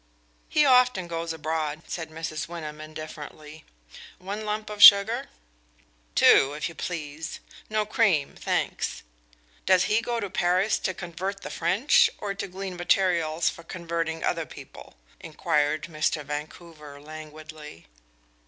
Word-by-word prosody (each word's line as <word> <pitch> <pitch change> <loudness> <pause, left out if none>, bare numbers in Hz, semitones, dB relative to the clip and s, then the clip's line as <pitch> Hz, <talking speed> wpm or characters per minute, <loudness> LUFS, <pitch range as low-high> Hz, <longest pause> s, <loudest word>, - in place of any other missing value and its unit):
"He 300 -1 +4
often 250 -8 +4
goes 165 0 -3
abroad," 155 0 -3
said 165 -2 -5
Mrs. 155 -1 -5
Wyndham 155 -3 -7
indifferently. 155 0 -9 0.5
"One 200 +4 -6
lump 210 0 -3
of 210 -1 -6
sugar?" 200 +3 +8 0.9
"Two, 135 +1 +6
if 150 - -2
you 170 - -9
please 160 -2 -5 0.3
no 215 0 0
cream 200 -9 +2
thanks. - - -2 0.6
Does 185 -1 +5
he 215 +2 +2
go 235 0 -2
to 205 - -3
Paris 185 +2 +1
to 185 - -2
convert 190 +3 -5
the - - -7
French, 185 - +3
or 200 -1 -4
to 200 0 -5
glean 190 0 -6
materials 175 -3 +1
for - - -12
converting 165 -1 -4
other 165 -2 -1
people?" - - -12 0.2
inquired 155 -2 0
Mr. 155 -1 -1
Vancouver 150 0 -8
languidly. 155 - -11
165 Hz, 130 wpm, -26 LUFS, 155-195 Hz, 0.9 s, sugar